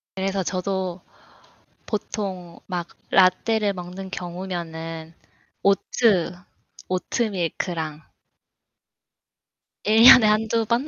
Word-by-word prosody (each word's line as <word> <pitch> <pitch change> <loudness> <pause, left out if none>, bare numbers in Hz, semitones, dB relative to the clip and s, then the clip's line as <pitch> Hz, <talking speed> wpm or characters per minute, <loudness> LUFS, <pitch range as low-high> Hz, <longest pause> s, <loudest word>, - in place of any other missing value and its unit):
그래서 195 0 -1
저도 185 -1 -3 0.9
보통 190 -5 -5
막 175 -3 -4 0.2
라떼를 200 +3 +3
먹는 185 +1 -8
경우면은 170 -3 -6 0.5
오트 195 -2 +2 0.5
오트밀크랑 175 -5 -2 1.8
1 220 +1 +4
년에 245 -2 +10
한 215 +1 +2
2 230 0 +1
번. 240 +6 0
185 Hz, 155 characters per minute, -23 LUFS, 175-210 Hz, 1.8 s, 년에